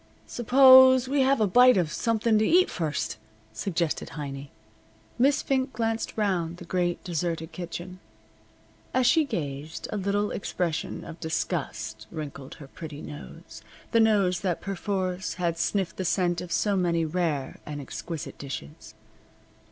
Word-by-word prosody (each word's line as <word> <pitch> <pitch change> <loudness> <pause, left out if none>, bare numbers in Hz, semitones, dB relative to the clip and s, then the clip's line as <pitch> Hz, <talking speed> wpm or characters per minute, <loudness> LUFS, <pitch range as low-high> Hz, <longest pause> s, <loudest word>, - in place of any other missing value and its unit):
"Suppose 260 +1 +7
we 275 +1 +2
have 270 0 +3
a 215 - +4
bite 245 +4 +6
of 170 -4 +1
something 225 -1 +1
to - - +2
eat 360 +10 +4
first," 150 -8 -3 0.3
suggested 170 - -2
Heiny. 140 -1 -6 0.7
Miss 275 +3 +3
Fink 265 0 0
glanced 225 -1 -2
round 175 -5 0
the 175 - -10
great, 175 0 -1
deserted 165 -2 -3
kitchen. 180 +1 -7 1.0
As 255 -1 +3
she 310 +5 +4
gazed 150 - -5
a 215 - -2
little 205 +1 0
expression 175 -5 -3
of 165 - -10
disgust 110 -10 -3
wrinkled 140 -3 -7
her 140 - -12
pretty 150 0 -9
nose 75 -3 -10 0.3
the 230 - +4
nose 200 -5 +3
that 185 -5 -1
perforce 190 -2 -3
had 170 -2 -1
sniffed 185 -2 -1
the 190 - -2
scent 175 -1 +1
of 180 - -8
so 205 +3 +1
many 170 -3 +1
rare 155 -5 -2
and 150 -1 -6
exquisite 150 +3 -7
dishes. 135 - -8
180 Hz, 145 wpm, -27 LUFS, 160-215 Hz, 1.0 s, Suppose